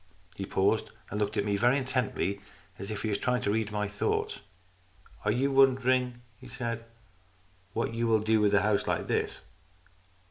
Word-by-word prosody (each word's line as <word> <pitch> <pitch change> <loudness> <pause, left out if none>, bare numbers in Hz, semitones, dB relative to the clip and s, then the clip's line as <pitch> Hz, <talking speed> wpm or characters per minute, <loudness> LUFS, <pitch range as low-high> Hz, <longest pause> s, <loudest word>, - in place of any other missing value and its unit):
He - - -5
paused - - +1 0.2
and 105 - -2
looked 105 +1 -1
at 100 - +1
me 100 -1 +1
very 120 +6 +3
intently, 125 -7 -1 0.4
as 100 - -6
if 105 -1 -4
he 110 - 0
were - - 0
trying 125 +4 0
to 100 - +1
read 110 0 0
my 105 0 -1
thoughts. 105 0 -1 0.8
"Are 105 - +3
you 135 +5 +1
wondering," 130 -2 +3 0.2
he 130 - -12
said, 115 -2 -4 0.4
" 90 0 -34
what 115 0 -1
you 115 0 0
will 110 -1 +3
do 110 0 +3
with 105 -1 +4
a 100 - +4
house 105 -1 +1
like - - 0
this - - -1
110 Hz, 185 wpm, -29 LUFS, 100-125 Hz, 0.8 s, with